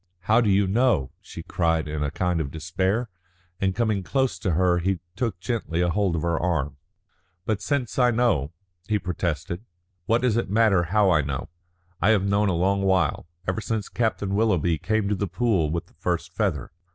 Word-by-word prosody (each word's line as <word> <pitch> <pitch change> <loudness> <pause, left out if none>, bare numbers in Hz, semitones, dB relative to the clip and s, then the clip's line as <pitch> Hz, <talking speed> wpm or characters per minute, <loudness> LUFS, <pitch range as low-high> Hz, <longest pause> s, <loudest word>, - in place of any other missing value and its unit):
"How 110 +6 +3
do 110 - +2
you 100 +1 +4
know?" 95 - +2
she - - -9
cried 80 -3 0
in 75 0 -3
a 75 - 0
kind 90 +2 0
of 70 - -3
despair, 95 - -1 0.5
and 95 -1 0
coming 110 -3 +1
close 130 -2 0
to 90 -1 0
her 90 +1 +3
he 95 +1 0 0.2
took 115 -8 -2
gently 90 -4 -2
hold 90 +1 +1
of 80 - -2
her 85 -2 0
arm. 75 -6 -1 0.7
"But 105 -1 -1
since 130 +1 -1
I 125 -1 +5
know," 110 - +1 0.4
he 110 - +2
protested, 85 -1 -3 0.4
"what 115 +2 +2
does 120 -3 +2
it 115 - -1
matter 100 -4 +3
how 100 +2 +3
I 80 -3 +4
know? 70 -2 -4 0.5
I 100 - +4
have 105 -3 +3
known 100 +1 +2
a - - +1
long 95 +3 +1
while, 95 -5 +1 0.2
ever 95 +4 -1
since 110 -2 -3
Captain 110 -4 -1
Willoughby 90 -7 +2
came 110 +4 0
to 105 - +1
The 100 0 -1
Pool 90 -3 +1
with 85 +1 -2
the - - -27
first - - -3
feather. - - -1
95 Hz, 190 wpm, -25 LUFS, 85-110 Hz, 0.7 s, I